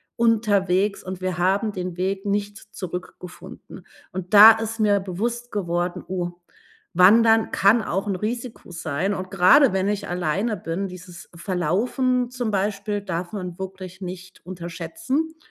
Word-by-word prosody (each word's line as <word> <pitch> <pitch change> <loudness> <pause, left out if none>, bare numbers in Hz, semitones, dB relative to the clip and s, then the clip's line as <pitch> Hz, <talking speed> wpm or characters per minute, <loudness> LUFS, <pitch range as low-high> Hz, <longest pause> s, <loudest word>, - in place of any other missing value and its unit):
unterwegs, 205 -4 +1
und 185 0 -7
wir 185 -1 -2
haben 195 +4 +1
den 180 -2 -5
Weg 190 +2 -2
nicht 205 +1 -2
zurückgefunden. 180 -3 -9 0.3
Und 185 +1 -7
da 215 +2 +11
ist 225 0 -5
mir 205 -1 +3
bewusst 230 +6 -4
geworden: 175 -2 -2
„Oh, 180 -1 -3 0.6
Wandern 225 +4 +5
kann 210 +4 +4
auch 195 +2 -2
'n 195 - -1
Risiko 235 -1 -5
sein.“ 170 +3 -2
Und 185 -1 -5
grade, 195 +7 +5
wenn 190 +1 0
ich 205 0 -2
alleine 180 +5 -1
bin 175 +3 -3
dieses 180 -1 -11
Verlaufen 230 - 0
zum 245 -3 -3
Beispiel 205 0 -2
darf 175 -2 -4
man 180 -3 -6
wirklich 190 0 -8
nicht 185 0 -9
unterschätzen. 180 - -4
190 Hz, 140 wpm, -23 LUFS, 180-215 Hz, 0.6 s, da